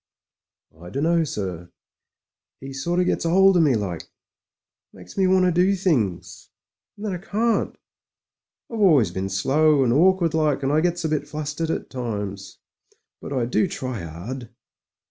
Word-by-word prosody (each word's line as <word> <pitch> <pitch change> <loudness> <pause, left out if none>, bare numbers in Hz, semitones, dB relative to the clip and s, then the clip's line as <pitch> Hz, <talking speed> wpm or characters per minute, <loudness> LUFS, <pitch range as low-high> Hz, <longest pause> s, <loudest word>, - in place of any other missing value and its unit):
"I 90 - -9
dunno, 165 - +1
sir. 90 - -5 0.9
'E 135 0 -8
sort 170 +7 -1
of - - +1
gets - - 0
'old 190 +3 +5
of - - +5
me, 145 -6 +3
like. 95 -6 -4 0.8
Makes 90 -1 -13
me 190 -1 +2
want 185 0 +4
to 180 - +3
do 180 +3 +3
things 130 - -1 0.2
— - - -67
^and 205 - -10
then 210 -3 -2
I - - -3
can't. 220 +5 -1 0.9
I've 230 - -4
always 150 - +4
been 95 +2 -3
slow 140 +9 +3
and 120 -2 +2
awkward 175 +2 +3
like, 150 -3 +1
and 135 - +1
I 155 +1 +3
gets 175 0 -1
a - - +2
\nt 145 -1 -4
flustered 150 +2 -4
at - - -3
times. 105 -6 -5 0.6
But - - -8
I 130 -4 0
do 125 +10 +1
try 130 - -5
'ard." 105 +10 -7
145 Hz, 165 wpm, -23 LUFS, 110-175 Hz, 0.9 s, old